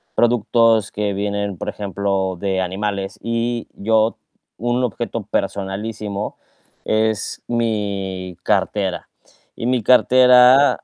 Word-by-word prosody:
productos 115 -1 +3
que 105 -1 -2
vienen, 100 -1 -2
por - - -4
ejemplo, 95 -2 -2
de 95 -1 -1
animales. 100 +2 -3
Y 115 0 -2
yo 110 +2 +1 0.4
un 120 +3 -1
objeto 120 -6 -3
personalísimo 100 +1 -3 0.5
es 110 -1 0
mi 100 -5 -2
cartera. - - -1 0.5
Y 115 - -5
mi 125 -2 +1
cartera 125 +2 +6
105 Hz, 100 wpm, -20 LUFS, 100-115 Hz, 0.5 s, cartera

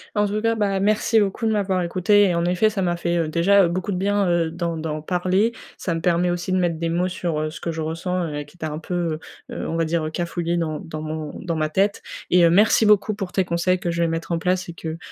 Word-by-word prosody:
En 205 0 +2
tout 210 +1 -2
cas, 230 +1 +1
bah 200 -3 0
merci 215 +2 +3
beaucoup 205 +3 -1
de 220 - +2
m'avoir 195 -3 0
écoutée 195 +4 +3
et 180 -3 +1
en 170 - +1
effet 180 +5 +2
ça 205 -2 -3
m'a 175 -2 0
fait, 170 0 -1
heu, 165 -2 0
déjà, 195 +5 +4
heu, 170 - +2
beaucoup 185 +3 -2
de - - -2
bien, 200 +1 +1
heu, 170 -2 +1
d'en 170 0 -3
d'en 155 -1 -4
parler. 185 +7 +1 0.2
Ça 170 - -2
me 165 - -3
permet 175 +1 +2
aussi 175 +1 -2
de 185 - +2
mettre 175 -3 0
des 165 +1 -2
mots 175 +2 +1
sur, 175 -3 -2
heu, 155 0 -1
ce 155 - -10
que 170 - -2
je 165 - -6
ressens 165 +3 -2
et 145 0 -4
qui 145 +4 -20
était 160 - -5
un 150 -1 -4
peu, 165 - -7 0.6
heu - - -7
heu, - - -4
on 165 - -2
va 165 - +1
dire, 165 0 0
heu, - - -2
cafouillé 175 +1 -2
dans 155 -3 -2
dans 155 -1 -7
mon 155 -1 -5
dans 170 -3 -3
ma 155 -1 0
tête 195 +5 +1 0.3
et 180 -1 +5
heu, 170 - +6
merci 210 +5 +4
beaucoup 210 0 +4
pour 195 -3 -5
tes 190 - +1
conseils 175 +1 +1
que 175 - -3
je 170 0 -1
vais 170 - +2
mettre 165 +1 -3
en 170 - +1
place 180 +1 0
et 170 - -7
que, 160 -1 -6
175 Hz, 285 wpm, -22 LUFS, 165-195 Hz, 0.6 s, heu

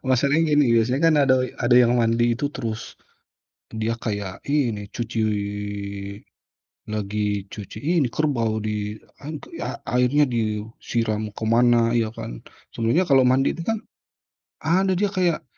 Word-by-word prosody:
Masalahnya 145 +4 +3
gini 140 -5 +4
biasanya 125 +4 +2
kan 165 -1 +5
ada 135 -2 +4 0.2
ada 120 0 +4
yang 120 -1 +6
mandi 120 +1 +2
itu 145 +3 -1
terus, 115 -3 -5 0.8
dia 110 +1 -2
kayak 100 -5 -5
ini 120 -9 0
cuci 115 -1 -4 1.7
lagi 105 -1 -2
cuci 105 -1 -8
ini 155 +1 +1
kerbau 115 -6 0
di 105 0 -3 0.3
an 155 +1 -4 0.2
a - - -4 0.2
airnya 130 +4 +4
disiram 110 -1 -2
kemana, 115 +1 +3
ya 115 -2 +1
kan. - - -7 0.3
Sebenarnya 115 +11 +1
kalau 135 -2 +6
mandi 130 +2 +3
itu - - -6
kan 225 0 0 0.8
ada 185 +4 +2
dia 205 +2 +1
kayak 175 -4 0
120 Hz, 130 wpm, -23 LUFS, 110-145 Hz, 1.7 s, yang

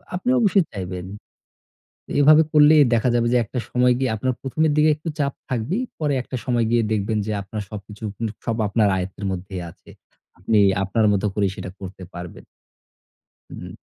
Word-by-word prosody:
আপনি 185 +7 -2
অবশ্যই 200 -4 +4
চাইবেন। 90 -2 -6 1.1
এইভাবে 150 +2 +7
করলেই 150 0 +7
দেখা 115 +2 +2
যাবে 120 0 +2
যে - - +5
একটা 125 +4 -4
সময় 125 0 +3
গিয়ে 130 -1 0
আপনার 130 +4 -1
প্রথমের 155 +4 0
দিকে 155 +1 +5
একটু 155 +2 -6
চাপ 140 -1 0 0.2
থাকবেই। 130 - -1 0.2
পরে 150 -2 0
একটা 130 - -7
সময় 120 -3 +1
গিয়ে 120 -1 +3
দেখবেন 110 +1 0
যে - - -1
আপনার 105 +2 -6
সবকিছু 105 +1 -10
স - - -53 0.3
সব 115 -1 -1
আপনার 105 +1 +2
আয়ত্তের 95 +2 -5
মধ্যেই 95 0 -5
আছে। - - -18 0.5
আপনি 105 +4 +2 0.2
আপনার 105 +3 +1
মতো 100 0 0
করেই 100 -2 +1
সেটা - - -6
করতে 95 0 -8
পারবেন। 90 0 -9 1.1
হু। - - -9
115 Hz, 170 wpm, -22 LUFS, 100-140 Hz, 1.1 s, এইভাবে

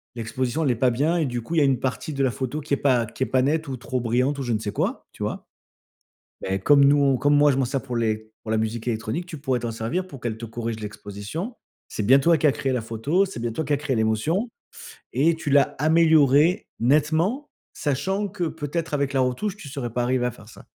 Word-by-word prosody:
l'exposition, 125 +6 -2
elle 140 - +2
est - - 0
pas 125 +2 +2
bien 150 +8 +1
et 165 - +1
du 120 -3 -3
coup, 160 +9 -5
il - - +1
y - - +4
a - - +5
une 135 -3 +2
partie 130 +4 -3
de 135 -1 0
la 130 - +2
photo 130 +5 -4
qui 145 - -4
est - - +3
pas 125 -5 +2
qui 120 - -4
est - - +1
pas 130 0 +2
nette 155 +4 0
ou 135 - -3
trop 125 +1 -3
brillante 125 +4 0
ou - - -2
je 120 -2 -1
ne 110 - 0
sais 105 -1 -4
quoi, - - -2
tu - - -7
vois? - - -4 1.0
Beh, 95 +1 -2
comme 140 +8 +5
nous, 140 +1 +5
on 140 -2 +3
comme 145 +3 +3
moi, 145 0 +5
je 130 - -1
m'en 135 - +2
sers 135 +2 -2
pour 125 -2 -6
les 110 -1 -1
pour - - -9
la 110 - +2
musique 110 +2 -2
électronique, 115 +9 -2
tu 160 -3 -7
pourrais 130 -3 -1
t'en 120 -1 -3
servir 115 +12 -3
pour 140 -7 -10
qu'elle 115 -2 -3
te 115 - -6
corrige 115 0 -4
l'exposition. 105 - -6 0.3
C'est 105 - -3
bien 130 +7 +6
toi 165 +3 +4
qui 155 - +3
as - - +5
créé 135 0 -2
la 125 - 0
photo, 115 - 0
c'est 190 - -7
bien 120 0 -2
toi 160 +7 -3
qui 145 - 0
as - - +3
créé 140 -2 -2
l'émotion 115 - 0 0.6
et 155 +6 +2
tu 160 -2 -5
l'as 140 -1 +3
améliorée 160 - +4
nettement. 160 - +2 0.3
Sachant 190 +9 -1
que 190 -2 -5
peut-être 160 0 -4
avec 140 -1 0
la 135 - +2
retouche, 130 +11 -1
tu 160 - -10
serais 130 -4 -4
pas 120 - 0
arrivée 125 0 +1
à 125 - 0
faire 105 0 -15
ça. - - -15
135 Hz, 260 wpm, -24 LUFS, 120-155 Hz, 1.0 s, bien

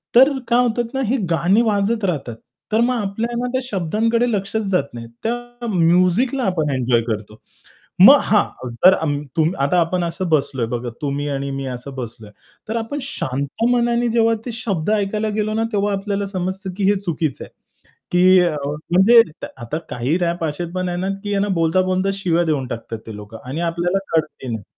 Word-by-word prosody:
तर 265 +4 +8 0.2
काय 240 +1 +3
होतात 240 0 0
ना 265 - -1
ही 260 +4 +1
गाणी 180 +7 +3
वाजत 215 0 +1
राहतात. 140 -10 -2 0.4
तर 220 - +2
मग 250 +1 +1
आपलं 235 +5 -2
त्या 260 0 0
शब्दांकडे 230 +4 0
लक्षच 205 +2 -1
जात 180 -6 +3
नाही. 115 -1 -7 0.2
त्या 240 +1 -4
म्युझिकला 185 +8 +2
आपण 160 -6 0
एन्जॉय 120 -2 +2
करतो. 105 -1 -4 0.6
मग - - +10
हां, 125 - 0
जर 180 +11 +5
अम 145 -2 -1 0.2
तुम 160 +1 +3
आता 155 +6 +3
आपण 175 +1 0
असं 170 +2 -3
बसलोय 140 -6 +1
बघा 120 +1 -4
तुम्ही 145 +1 -2
आणि 140 0 -3
मी 135 0 -4
असं 130 +2 -6
बसलोय, 115 -4 -8 0.4
तर 225 - -2
आपण 230 +6 -3
शांत 140 - -3
मनाने 240 0 +2
जेव्हा 230 0 +3
ते 240 - -3
शब्द 205 -6 -2
ऐकायला 215 +1 0
गेलो 215 0 -1
ना, 225 +1 +1
तेव्हा 205 0 +1
आपल्याला 200 0 -2
समजतं 190 0 -4
की 200 - -1
हे 205 - +2
चुकीचं 160 -6 -2
आहे. - - -14 0.6
की 185 +1 +6
अ, 170 -3 +1 0.4
म्हणजे 220 +6 +7 0.4
आता 125 +5 -4
काही 130 +8 0
रॅप 170 -1 -1
असे 155 +3 -3
पण 185 -1 -2
आहेत 175 0 -3
ना 190 - -1
की 205 -1 -1
ना 205 - +1
बोलता-बोलता 185 +3 +1
शिव्या 175 -3 +1
देऊन 140 -5 0
टाकतात 115 -1 -6
ते 110 - -7
लोक 105 +2 -10
आणि 135 +6 -5
आपल्याला 170 +2 0 0.2
कळतही 155 -4 -1
नाही. 110 -3 -4
185 Hz, 180 wpm, -20 LUFS, 145-220 Hz, 0.6 s, मग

